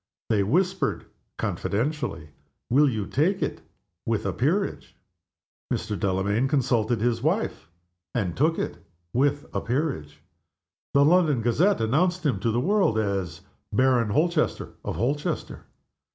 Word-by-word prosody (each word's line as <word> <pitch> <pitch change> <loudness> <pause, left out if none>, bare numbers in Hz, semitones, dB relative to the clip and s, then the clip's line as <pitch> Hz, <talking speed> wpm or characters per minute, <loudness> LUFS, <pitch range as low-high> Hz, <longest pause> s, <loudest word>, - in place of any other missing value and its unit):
They 105 -2 +3
whispered 175 - 0 0.3
confidentially, 120 - -2 0.4
"Will 145 +3 +5
you 110 -5 -2
take 170 - +1
it - - -3 0.4
with - - -1
a - - 0
peerage?" - - -1 0.8
Mr. 105 - -1
Delamayn 100 +6 +1
consulted 120 -5 +1
his 115 -1 +1
wife, 160 - -1 0.5
and 95 -8 -1
took 160 +4 +2
it - - -3 0.4
with 145 +3 +1
a - - -1
peerage. 125 - -2 0.8
The 140 0 +6
London 155 -7 +3
Gazette 170 - +2
announced 175 +10 +1
him 125 -10 +1
to 115 - 0
the 115 +2 +1
world 185 - +2
as 95 -6 -2 0.3
Baron 125 0 +3
Holchester 155 +7 +1
of - - -3
Holchester. 140 +5 -2
130 Hz, 125 wpm, -25 LUFS, 110-155 Hz, 0.8 s, The